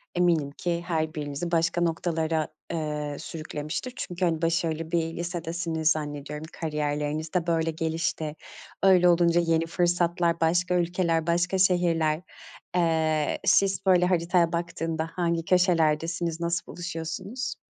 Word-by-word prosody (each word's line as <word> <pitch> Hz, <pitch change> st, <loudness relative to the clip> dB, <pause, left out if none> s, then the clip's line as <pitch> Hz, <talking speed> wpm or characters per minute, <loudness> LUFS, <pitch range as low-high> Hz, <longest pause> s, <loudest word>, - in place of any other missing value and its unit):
eminim 170 Hz, -5 st, +2 dB
ki 170 Hz, +3 st, -2 dB
her 160 Hz, -2 st, -1 dB
birinizi 150 Hz, +3 st, -4 dB
başka 165 Hz, +1 st, +1 dB
noktalara, 160 Hz, -2 st, 0 dB, 0.3 s
eee, 150 Hz, -2 st, -3 dB
sürüklemiştir. 155 Hz, +9 st, -5 dB
Çünkü, 180 Hz, -5 st, -2 dB
hani, 165 Hz, -2 st, 0 dB
başarılı 165 Hz, -1 st, 0 dB
bir 165 Hz, -1 st, 0 dB
lisedesiniz 170 Hz, -2 st, -1 dB
zannediyorum. 150 Hz, 0 st, -4 dB
Kariyerlerinizde 150 Hz, +2 st, -2 dB
böyle 165 Hz, -1 st, +1 dB
gelişti, 160 Hz, -1 st, -2 dB, 0.5 s
öyle 185 Hz, -2 st, +6 dB
olunca 170 Hz, 0 st, +4 dB
yeni 165 Hz, -1 st, +1 dB
fırsatlar, 175 Hz, -1 st, +1 dB
başka 175 Hz, +2 st, +2 dB
ülkeler, 170 Hz, -2 st, +1 dB
başka 175 Hz, +2 st, +1 dB
şehirler. 170 Hz, -4 st, +2 dB, 0.5 s
Eee, 160 Hz, -3 st, +1 dB
siz, 195 Hz, -2 st, +3 dB
böyle, 180 Hz, -2 st, +5 dB
haritaya 175 Hz, -1 st, +2 dB
baktığında 165 Hz, -1 st, -2 dB
hangi 170 Hz, -2 st, 0 dB
köşelerdesiniz, 170 Hz, -1 st, +2 dB
nasıl 170 Hz, 0 st, -1 dB
buluşuyorsunuz? 180 Hz, +8 st, -5 dB
165 Hz, 115 wpm, -26 LUFS, 160-175 Hz, 0.5 s, öyle